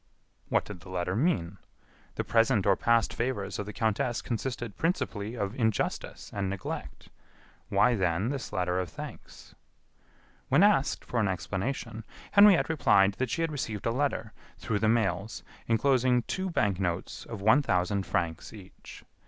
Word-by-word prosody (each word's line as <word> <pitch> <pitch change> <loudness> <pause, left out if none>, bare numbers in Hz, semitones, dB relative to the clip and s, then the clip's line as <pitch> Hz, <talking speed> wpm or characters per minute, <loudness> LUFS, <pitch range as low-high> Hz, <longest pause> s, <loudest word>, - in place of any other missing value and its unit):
What - - +2
did 105 -4 -8
the 90 - -14
letter 90 0 -2
mean? 100 - 0 0.6
The - - -1
present 115 -3 +2
or 100 -1 +5
past 115 +1 +2
favors 120 -4 -2
of 105 - -4
the - - -4
countess 110 +2 -1
consisted 120 -2 -4
principally 115 - -2
of 100 -3 -2
injustice 110 -5 -2
and 100 -1 -2
neglect. 100 -1 -6 0.6
Why, 125 - +4
then, 95 0 0
this 135 -3 -4
letter 90 0 0
of 90 -2 -3
thanks? - - -10 1.0
When 145 +8 +5
asked 205 -10 +3
for 120 - -2
an 105 - +2
explanation, 110 +5 -3 0.3
Henriette 200 -3 +7
replied 100 -11 +4
that 130 -1 0
she 165 - -1
had 165 - -1
received 110 -8 -4
a 115 - +2
letter, 130 -4 -1 0.2
through 105 -2 -2
the 110 - +2
mails, 110 -2 0 0.2
enclosing 125 +1 +3
two 190 +7 -3
bank 105 - 0
notes 90 -1 -3
of 115 -3 -7
one 110 +9 +5
thousand 95 -4 0
francs 85 -2 -2
each. 100 -4 -13
110 Hz, 155 wpm, -29 LUFS, 95-130 Hz, 1.0 s, Henriette